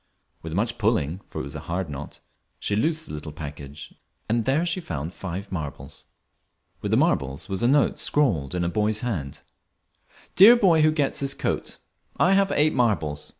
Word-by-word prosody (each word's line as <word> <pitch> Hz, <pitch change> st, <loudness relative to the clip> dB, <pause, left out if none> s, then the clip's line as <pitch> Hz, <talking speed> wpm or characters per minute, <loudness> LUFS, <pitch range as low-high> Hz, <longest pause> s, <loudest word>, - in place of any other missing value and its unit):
With 80 Hz, 0 st, -6 dB
much 115 Hz, +4 st, -1 dB
pulling, 100 Hz, -6 st, 0 dB
for -, -, -6 dB
it -, -, -3 dB
was 70 Hz, 0 st, -7 dB
a -, -, -5 dB
hard 90 Hz, +1 st, -2 dB
knot, 75 Hz, 0 st, -8 dB, 0.4 s
she 100 Hz, -, -2 dB
loosed 155 Hz, +7 st, 0 dB
the -, -, -9 dB
little 75 Hz, +1 st, -6 dB
package, 75 Hz, -1 st, -9 dB, 0.3 s
and 115 Hz, +1 st, 0 dB
there 145 Hz, +6 st, +2 dB
she 175 Hz, +2 st, -1 dB
found 80 Hz, -, -5 dB
five 95 Hz, +2 st, -6 dB
marbles. 80 Hz, -6 st, -6 dB, 0.8 s
With -, -, -3 dB
the -, -, +3 dB
marbles 65 Hz, +1 st, +1 dB
was 95 Hz, -1 st, -3 dB
a 120 Hz, -, +3 dB
note 140 Hz, +2 st, +3 dB
scrawled 90 Hz, -, +1 dB
in 90 Hz, -, 0 dB
a -, -, 0 dB
boy's 105 Hz, +3 st, 0 dB
hand 85 Hz, -, -4 dB, 0.9 s
"DEAR 215 Hz, +6 st, +9 dB
BOY 185 Hz, -9 st, +4 dB
WHO 155 Hz, 0 st, +5 dB
GETS 145 Hz, -3 st, 0 dB
THIS 140 Hz, -1 st, -1 dB
COAT, -, -, -3 dB, 0.4 s
I 190 Hz, -, +4 dB
have 195 Hz, 0 st, +3 dB
eight 155 Hz, +1 st, +3 dB
marbles. 80 Hz, -12 st, 0 dB
100 Hz, 185 wpm, -24 LUFS, -, 0.9 s, DEAR